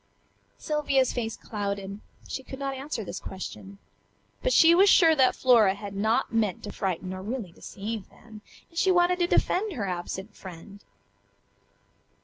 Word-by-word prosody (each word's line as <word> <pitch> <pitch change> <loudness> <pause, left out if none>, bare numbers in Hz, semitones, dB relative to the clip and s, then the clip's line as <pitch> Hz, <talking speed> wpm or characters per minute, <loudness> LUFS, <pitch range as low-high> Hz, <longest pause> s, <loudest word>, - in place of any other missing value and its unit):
Sylvia's 285 -4 +1
face 225 -3 -3
clouded; 200 -1 -4 0.3
she - - -4
could 265 +1 -9
not 275 0 -3
answer 270 -3 -4
this 185 - -6
question, 190 +1 -8 0.6
but - - +1
she 335 -7 +7
was 390 +3 +6
sure 330 -4 +6
that 260 -3 +4
Flora 225 -7 +5
had 200 -1 -8
not 220 +4 +1
meant 215 -5 0
to 205 - -6
frighten 185 -1 -3
or 185 - -6
really 215 -2 -5
deceive 210 +4 -7
them, 220 -2 -14 0.3
and 335 - -3
she 380 - +3
wanted 360 0 +3
to 350 - +2
defend 390 +3 +1
her 215 -9 -3
absent 190 +3 -5
friend. 190 +3 -11
220 Hz, 155 wpm, -27 LUFS, 195-280 Hz, 0.6 s, she